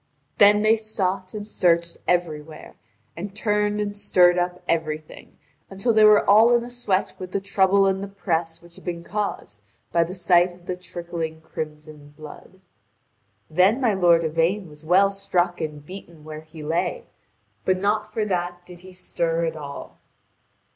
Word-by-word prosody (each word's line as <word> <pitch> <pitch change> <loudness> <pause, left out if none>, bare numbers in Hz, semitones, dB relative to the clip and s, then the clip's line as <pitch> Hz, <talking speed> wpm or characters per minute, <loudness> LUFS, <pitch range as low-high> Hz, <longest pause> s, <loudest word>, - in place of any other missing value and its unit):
Then 210 +1 +6
they 220 +1 +4
sought 195 -3 -3
and 210 0 -6
searched 170 -4 +1
everywhere, 160 -3 -2 0.4
and 195 +4 -7
turned 210 -1 0
and 205 -1 -3
stirred 180 -3 +4
up 180 0 -3
everything, 155 -2 -4 0.3
until 195 +5 0
they 215 0 +5
were 210 -1 +6
all 225 +4 +6
in 235 - +1
a 240 - -8
sweat 210 -6 -1
with 185 -1 -8
the 200 - +1
trouble 195 0 +3
and 190 0 +1
the 200 - -5
press 170 -4 -3
which 170 0 -15
had - - -15
been 170 -2 -5
caused 200 - -4 0.3
by 170 - +3
the 175 +3 -7
sight 175 -1 +3
of 175 -1 -21
the 180 - -3
trickling 170 -3 -6
crimson 150 -2 -8
blood. 155 +4 -13 0.9
Then 185 - +3
my 240 -5 +2
lord 175 -3 +4
Yvain 165 +5 0
was 150 0 -15
well 190 +5 +4
struck 180 -3 -1
and 150 -2 -5
beaten 170 -3 -11
where 155 0 -8
he 155 0 -12
lay, 175 - -2 0.6
but 185 0 +1
not 210 +2 -1
for 215 - -1
that 175 -2 -3
did 180 -1 -13
he 185 +1 -14
stir 170 -2 -2
at 160 -1 -3
all. 145 -2 -9
180 Hz, 170 wpm, -23 LUFS, 165-200 Hz, 0.9 s, Then